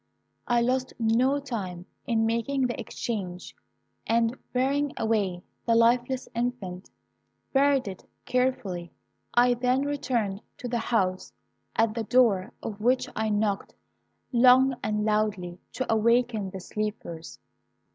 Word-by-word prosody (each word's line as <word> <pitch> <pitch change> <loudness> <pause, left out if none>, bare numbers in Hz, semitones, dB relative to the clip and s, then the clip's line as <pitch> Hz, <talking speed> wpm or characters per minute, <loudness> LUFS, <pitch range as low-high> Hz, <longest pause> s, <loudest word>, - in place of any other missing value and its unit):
I 240 -1 +3
lost 255 +2 0
no 245 +5 +2
time 195 -10 -5 0.2
in 225 -2 +2
making 235 +4 0
the 245 - -2
exchange, 195 -6 -5 0.5
and 230 +1 +2 0.2
bearing 275 +3 +1
away 200 -6 0 0.2
the 230 - +4
lifeless 245 +3 +3
infant, 230 -6 -3 0.6
buried 275 -3 +3
it 190 -1 -7 0.2
carefully. 205 -9 -1 0.4
I 245 +1 +5
then 250 +2 +1
returned 240 -8 -1 0.2
to 250 - -5
the 240 0 -1
house, 190 -5 0 0.4
at 225 -1 +2
the 230 0 -2
door 225 -4 +3
of 210 -1 -5
which 250 +3 +2
I 220 0 0
knocked 205 -1 -1 0.6
long 255 +2 +6
and 210 0 -1
loudly, 205 -5 0
to 260 -3 -1
awaken 230 -2 +2
the 190 0 -7
sleepers. 205 -6 -5
230 Hz, 125 wpm, -27 LUFS, 205-250 Hz, 0.6 s, long